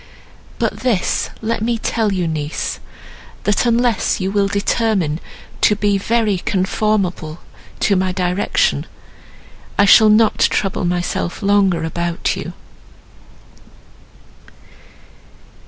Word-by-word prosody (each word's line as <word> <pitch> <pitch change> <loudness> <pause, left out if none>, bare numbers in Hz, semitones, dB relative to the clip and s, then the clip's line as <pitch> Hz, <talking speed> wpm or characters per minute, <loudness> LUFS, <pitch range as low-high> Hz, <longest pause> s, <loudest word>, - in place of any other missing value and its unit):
But - - -2
this 235 -8 0
let 230 0 -1
me 235 +1 0
tell 225 -1 -1
you 180 -3 -1
niece, 155 -1 -3 0.6
that, 205 +4 +1
unless 235 -2 +1
you 190 0 -2
will 200 -1 +2
determine 200 -5 0 0.4
to 210 - +4
be 205 -1 +1
very 215 -2 +1
conformable 185 -4 -1 0.4
to 200 - +3
my 185 0 0
direction, 180 +1 0 0.9
I 200 - +5
shall 215 +2 +7
not 215 +1 +3
trouble 195 -2 +1
myself 175 +2 -2
longer 195 -4 +2
about 170 +1 -2
you." - - -6
200 Hz, 105 wpm, -18 LUFS, 180-215 Hz, 0.9 s, shall